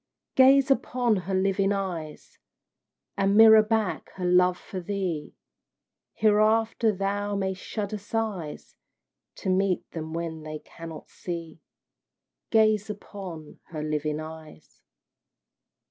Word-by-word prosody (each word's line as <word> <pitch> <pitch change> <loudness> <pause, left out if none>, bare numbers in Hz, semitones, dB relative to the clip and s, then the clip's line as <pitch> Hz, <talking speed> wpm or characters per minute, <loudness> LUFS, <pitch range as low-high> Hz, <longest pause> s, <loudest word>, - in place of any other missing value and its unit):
Gaze 270 +1 +6
upon 245 -4 +2
her 190 0 -2
living 195 +1 +2
eyes, 180 -6 -5 0.8
And 200 +1 +2
mirror 220 -1 +9
back 215 -2 -1
her 185 - -4
love 180 0 +4
for 190 - -7
thee, 180 -4 -3 0.8
Hereafter 220 +1 +3
thou 200 +1 -2
mayst 190 -1 -2
shudder 210 -1 -4
sighs 205 -7 -4 0.6
To 195 - -4
meet 190 0 +1
them 160 -1 -6
when 165 -1 -4
they 155 0 -6
cannot 165 0 -11
see. 165 -2 -6 0.9
Gaze 215 -1 +3
upon 190 -7 -8
her 155 -2 -6
living 150 0 -2
eyes! 155 - -11
195 Hz, 110 wpm, -26 LUFS, 165-215 Hz, 0.9 s, mirror